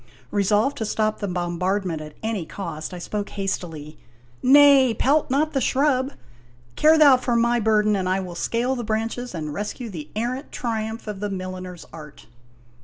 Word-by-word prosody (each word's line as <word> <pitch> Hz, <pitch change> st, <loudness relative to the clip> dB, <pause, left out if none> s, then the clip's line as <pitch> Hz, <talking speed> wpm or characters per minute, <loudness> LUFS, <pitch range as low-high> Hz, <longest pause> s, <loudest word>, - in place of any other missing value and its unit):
Resolved 210 Hz, +7 st, +2 dB
to 225 Hz, -, -2 dB
stop 215 Hz, 0 st, 0 dB
the 205 Hz, -, -3 dB
bombardment 180 Hz, -1 st, -2 dB
at 150 Hz, -1 st, -10 dB
any 220 Hz, -5 st, -2 dB
cost, 160 Hz, -2 st, -6 dB
I 180 Hz, -, -7 dB
spoke 205 Hz, +3 st, -4 dB
hastily: 165 Hz, -6 st, -5 dB, 0.2 s
" 120 Hz, 0 st, -31 dB
Nay, 270 Hz, -2 st, +6 dB
pelt 290 Hz, +3 st, +2 dB
not 300 Hz, +4 st, +1 dB
the 270 Hz, -, +1 dB
shrub! 265 Hz, -1 st, +1 dB, 0.6 s
Care 315 Hz, +1 st, +5 dB
thou 285 Hz, -4 st, +7 dB
for 250 Hz, -1 st, -1 dB
my 235 Hz, +1 st, +3 dB
burden, 215 Hz, -1 st, +2 dB
and 185 Hz, -2 st, -1 dB
I 190 Hz, +1 st, +1 dB
will 185 Hz, -2 st, -6 dB
scale 235 Hz, +8 st, -1 dB
the 240 Hz, -, -4 dB
branches 225 Hz, +2 st, -3 dB
and 150 Hz, -2 st, -4 dB
rescue 210 Hz, -, -5 dB
the 155 Hz, -5 st, -8 dB
errant 250 Hz, +6 st, -3 dB
triumph 225 Hz, -1 st, -3 dB
of 210 Hz, -3 st, -6 dB
the 205 Hz, 0 st, -3 dB
milliner's 185 Hz, -2 st, -6 dB
art 150 Hz, -8 st, -11 dB
210 Hz, 175 wpm, -23 LUFS, 180-250 Hz, 0.6 s, thou